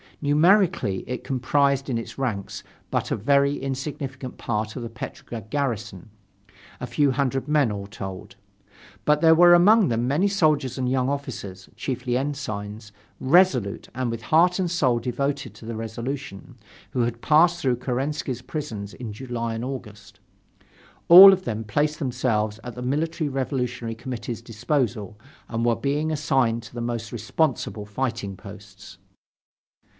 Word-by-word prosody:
Numerically 160 - +3
it 125 -1 -4
comprised 135 +1 +1
in 120 - 0
its 115 - -7
ranks 115 -8 -3 0.3
but - - -2
a - - +2
very 140 +5 +2
insignificant 135 -1 -5
part 110 -1 -3
of 125 - -5
the 115 - -5
Petrograd 115 -1 -8
garrison, 115 - -3 0.7
a 125 - -5
few 140 +4 +2
hundred 135 0 -1
men 150 -6 +2
all 100 -1 -5
told. 95 -2 -8 0.7
But 150 0 +3
there 160 -1 +6
were 175 +1 +7
among 205 +4 +5
them 120 +1 0
many 155 +9 +2
soldiers 155 - +1
and 130 -1 -1
young 130 0 +1
officers, 100 -9 -6
chiefly 125 -2 -2
ensigns, 110 -6 -5 0.3
resolute, 130 - +2
and 130 0 -2
with 115 -1 -5
heart 175 +6 +4
and 185 -2 0
soul 130 -8 +2
devoted 135 0 -2
to 110 - -13
the 115 0 -5
Revolution, 120 +1 -6 0.4
who 130 -3 0
had 120 0 -2
passed 170 +3 +4
through 130 -5 +1
Kerensky's 130 0 -3
prisons 120 -9 -6
in 115 -4 -7
July 115 0 -4
and 115 +2 -4
August. 105 -6 -8 0.9
All 190 +3 +12
of 185 -1 0
them 110 - -2
had 110 - -7
placed 150 +7 0
themselves 115 -6 -1
at 120 - -7
the 125 - -8
Military 155 +4 -1
Revolutionary 125 -4 -3
Committee's 115 -1 -6
disposal 115 - -2 0.3
and 115 0 -2
were 120 -1 +3
being 150 +4 -1
assigned 135 -6 +1
to 110 - -13
the 120 - -5
most 115 -2 -4
responsible 120 -1 -1
fighting 110 -2 -3
posts. 100 0 -13
125 Hz, 150 wpm, -24 LUFS, 115-145 Hz, 0.9 s, All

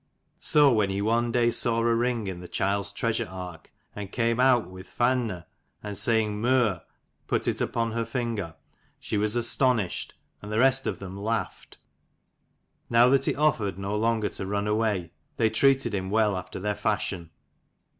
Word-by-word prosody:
So 145 -3 +4
when 105 -3 +2
he 95 0 -2
one 115 +3 +1
day 120 0 +2
saw 115 0 +1
a 115 0 +2
ring 120 -1 0
in 95 -2 -5
the 90 - -9
child's 100 +3 -1
treasure 115 +2 -1
ark, 90 -3 -9 0.2
and 100 -1 -7
came 115 -1 0
out 125 -6 +4
with 95 +1 -12
"Fainne," 120 -8 0 0.4
and 105 -1 -5
saying 105 0 +2
"Meur" 120 -7 +2 0.5
put - - 0
it - - -1
upon 115 -1 -1
her 115 +1 -1
ringer, 115 -10 -3 0.4
she - - -4
was 105 +2 0
astonished, 120 -4 0 0.3
and 105 - -8
the 105 - -1
rest 135 +2 +3
of - - -2
them 95 -1 -8
laughed. 110 +3 -4 1.1
Now 120 +1 +5
that 135 0 +3
he - - +1
offered 110 - +1
no 100 +1 -3
longer 110 -1 +1
to 95 - -6
run 100 +1 -1
away, 105 -5 0 0.3
they 110 -1 +2
treated 135 0 +2
him 95 -1 -2
well 105 -1 +2
after 90 0 -6
their 105 +2 -1
fashion. 95 -5 -2
110 Hz, 170 wpm, -26 LUFS, 100-120 Hz, 1.1 s, Now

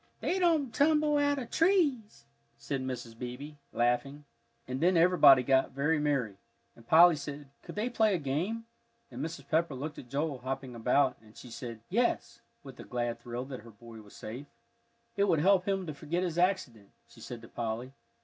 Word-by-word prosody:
"They 375 - -1
don't 320 -8 +2
tumble 300 0 +3
out 285 0 +2
of 250 -4 -6
trees," 320 - +1 0.3
said 135 +3 -4
Mrs. 125 -3 -5
Beebe, 125 +5 -7 0.2
laughing. 135 +5 0 0.4
And 130 +2 -4
then 180 +1 +4
everybody 160 -7 +7
got 130 0 +2
very 150 +3 +1
merry, 135 -9 -1 0.4
and 115 - -19
Polly 170 +3 +7
said, 145 -1 -8
Could - - -10
they 215 +3 -1
play 220 -4 +2
a - - +1
game? 170 +11 -2 0.5
and 125 +3 -5
Mrs. 165 +2 -6
Pepper 160 -2 +1
looked 145 +4 -6
at 125 - -12
Joel 140 0 -2
hopping 130 0 -5
about, 125 +4 +2
and 110 -1 -19
she 125 - -11
said, 115 -1 -7
Yes, 235 +5 -1 0.2
with 135 -3 -12
a - - -7
glad 120 -1 -3
thrill 120 +1 -5
that 130 -2 -7
her 115 - -13
boy 115 +1 -13
was 105 -1 -16
safe. 125 +7 -8 0.7
"It 200 - +3
will 175 -5 +2
help 185 +3 +3
him 195 -1 0
to 155 - -5
forget 155 +5 -3
his 175 -2 -2
accident," 175 - 0 0.2
she - - -17
said 120 -1 -8
to - - -10
Polly. 120 +3 -4
145 Hz, 190 wpm, -30 LUFS, 125-185 Hz, 0.7 s, everybody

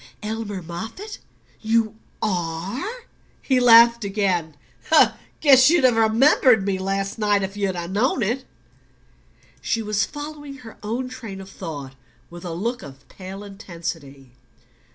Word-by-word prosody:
"Elmer 210 -3 -4
Moffatt 225 - -7 0.4
you 225 -1 +1 0.3
ARE?" 195 - -3 0.4
He 260 -2 +1
laughed 235 -1 +7
again. 190 -6 -1 0.9
"Guess 265 -2 +7
you'd 335 -3 +3
have 250 -3 +5
remembered 225 0 +4
me 195 -2 -1
last 195 +2 -2
night 205 -2 +2
if 195 +1 -4
you'd 200 -2 -1 0.2
known 235 +4 +1
it." 240 +6 -1 1.2
She 230 -2 -1
was 210 -1 0
following 290 -1 -7
her 245 -4 -12
own 235 +5 -3
train 230 -6 -8
of 195 0 -10
thought 145 -7 -7 0.4
with 175 +1 -10
a 175 - -5
look 230 +9 -3
of 135 -1 -13
pale 195 +1 -9
intensity. 165 - -8
210 Hz, 130 wpm, -23 LUFS, 190-245 Hz, 1.2 s, laughed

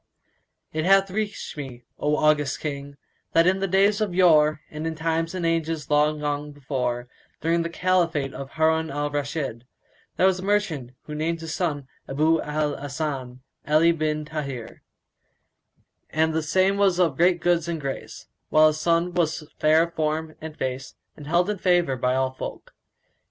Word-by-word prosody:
It 155 0 -1
hath 195 +1 +4
reached 210 0 -3
me, 130 -5 -8 0.2
O 150 +1 +1
august 150 -2 +2
King, 140 -1 -5 0.4
that 165 0 +5
in 190 +2 +3
days 200 +3 +3
of 200 -5 -1
yore 155 -4 +5
and 155 +1 -4
in 160 - -3
times 165 +2 -1
and 180 -2 -2
ages 165 -3 -1
long 150 +1 +3
gone 145 0 -2
before, 125 -3 -3 0.3
during 165 +1 +2
the 165 - -2
Caliphate 170 -6 +1
of 135 -1 -7
Harun 160 0 +2
al 145 +1 -2
Rashid, 140 -4 -3 0.5
there - - +4
was 190 -1 +3
a - - -7
merchant 185 - 0
who 150 - -8
named 165 +2 -1
his 160 -1 -5
son 145 -7 -2 0.2
Abú 155 +4 +2
al 150 -1 -1
Hasan[FN#174] 140 -3 -4 0.3
Ali 160 +2 +5
bin 155 -2 -1
Táhir; 140 -6 -6 1.3
and 160 +1 +1
the 160 - +1
same 185 +6 +2
was 195 -3 +3
great 175 +1 +3
of 170 - -16
goods 175 -1 +2
and 170 -1 -2
grace, 135 -2 -6 0.2
while 155 0 +6
his 155 0 -4
son 170 +2 +1
was 160 -3 -1
fair 155 +1 +5
of 170 0 -5
form 155 0 -2
and 155 -1 -8
face 130 0 -4 0.2
and 145 - -11
held 175 +3 +2
in 210 -2 -2
favour 175 -7 +2
by 125 0 0
all 130 0 +1
folk. 130 - -8
155 Hz, 170 wpm, -24 LUFS, 145-170 Hz, 1.3 s, while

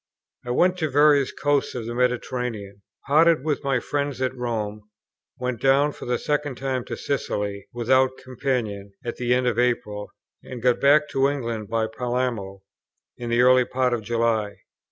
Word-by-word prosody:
I 120 - -8
went 180 +9 +2
to 155 -3 0
various 145 0 +4
coasts 145 -2 0
of 120 -3 -4
the 120 - -4
Mediterranean; 125 -4 -2 0.2
parted 155 0 +4
with 150 -2 -1
my 135 -2 +1
friends 140 +1 -2
at 130 0 -1
Rome; 110 -4 -3 0.6
went 125 -3 -3
down 140 +2 +4
for - - -10
the 125 0 +1
second 145 -1 -1
time 130 -1 -2
to - - -5
Sicily 105 -7 -3
without 130 +2 +2
companion, 120 -6 -3
at 120 - -4
the 120 -1 -2
end 125 0 0
of 120 -2 +1
April; 120 -4 -1 0.3
and 125 - -8
got 125 +1 +2
back 150 +2 +5
to 135 0 +2
England 115 -7 -4
by 115 -1 +1
Palermo 110 -4 -3 0.5
in 120 -1 -6
the 120 +1 +3
early 125 0 +6
part 125 0 0
of 120 - -1
July. 115 -2 -1
125 Hz, 170 wpm, -24 LUFS, 115-135 Hz, 0.6 s, early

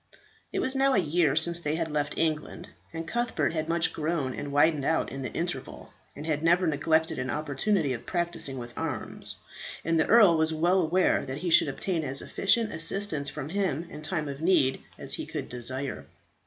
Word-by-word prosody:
It - - -1
was 260 - +3
now 270 0 +3
a - - +3
year 165 -4 +2
since 170 +2 +4
they 150 -2 -2
had 160 -1 -2
left 145 -1 -2
England, 155 -2 -2 0.2
and 165 0 -6
Cuthbert 235 -10 -1
had 160 0 -2
much 170 0 +2
grown 155 -4 -2
and 145 +2 -6
widened 145 0 +3
out 160 +3 0
in 135 - -6
the 130 - -4
interval, - - -5 0.2
and 150 - -8
had 155 -2 -1
never 175 +3 +3
neglected 160 0 +1
an 130 0 -3
opportunity 145 - 0
of 120 - -8
practising 170 -6 -1
with 120 -1 -8
arms; - - -4 0.5
and 165 0 +2
the 160 - +2
earl 210 -8 +6
was 160 0 +1
well 175 +4 +3
aware 180 +3 +2
that 130 +1 -4
he 175 +2 -3
should 160 - +7
obtain 165 +4 -2
as 135 -1 -2
efficient 220 +2 +2
assistance 165 -3 -1
from 150 -1 -6
him 175 -4 -1
in 150 - -8
time 155 -1 -2
of 140 +1 -6
need 160 -7 +2 0.2
as - - -1
he - - -4
could - - -5
desire. 130 +2 -3
160 Hz, 195 wpm, -27 LUFS, 145-175 Hz, 0.5 s, should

